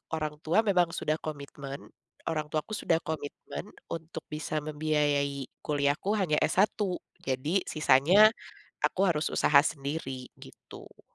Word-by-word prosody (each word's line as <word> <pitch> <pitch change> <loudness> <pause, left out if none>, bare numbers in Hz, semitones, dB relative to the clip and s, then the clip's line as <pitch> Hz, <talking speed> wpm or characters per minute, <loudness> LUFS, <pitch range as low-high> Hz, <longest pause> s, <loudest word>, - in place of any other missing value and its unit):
orang 150 -1 -3
tua 170 +8 +2
memang 185 -5 +3
sudah 155 +1 -1
komitmen, 140 -2 -7 0.4
orang 155 -2 -2
tuaku 155 +7 -3
sudah 165 -5 +1
komitmen 150 -2 -5 0.3
untuk 165 0 -6
bisa 155 0 -3
membiayai 145 -2 0 0.2
kuliah 145 -1 +1
ku 205 +3 0
hanya 175 -7 +1
S1. 190 +8 +2 0.5
Jadi 145 +9 +1
sisanya, 165 +8 +6 0.6
aku 190 - 0
harus 155 -2 +1
usaha 140 -1 +6
sendiri 140 -4 -4
gitu. - - -14
155 Hz, 125 wpm, -29 LUFS, 145-165 Hz, 0.6 s, sisanya